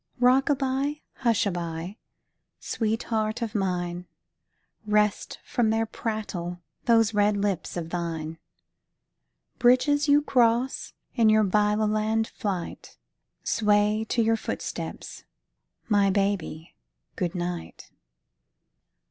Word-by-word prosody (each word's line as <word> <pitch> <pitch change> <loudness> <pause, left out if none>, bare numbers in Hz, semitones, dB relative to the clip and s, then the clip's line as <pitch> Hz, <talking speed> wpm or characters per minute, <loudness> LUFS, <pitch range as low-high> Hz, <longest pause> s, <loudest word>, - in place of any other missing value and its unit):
Rock 255 +3 +4
a 290 - +4
by, 275 +2 -1 0.2
hush 235 -5 +2
a 200 - +1
by, 170 +3 -5 0.6
sweetheart 220 0 -1
of 220 -2 -4
mine, 180 -3 -2 0.8
Rest 210 -1 +1
from 235 -3 +1
their 225 +1 +1
prattle 205 -6 -4 0.3
those 225 -2 +4
red 205 0 +3
lips 200 -4 -2
of 165 -1 -5
thine. 165 -2 -4 1.2
Bridges 285 +4 +4
you 290 +1 +5
cross 245 -1 +1 0.2
in 230 -3 +4
your 215 0 +5
Byloland 215 +2 +2
flight 190 -5 -5 0.5
Sway 210 -1 +2
to 235 - +2
your 225 0 +2
footsteps, - - -5 0.6
my 205 -2 +3
baby, 195 -5 -1 0.4
good 180 0 -2
night. 175 -1 -5
210 Hz, 105 wpm, -26 LUFS, 185-230 Hz, 1.2 s, you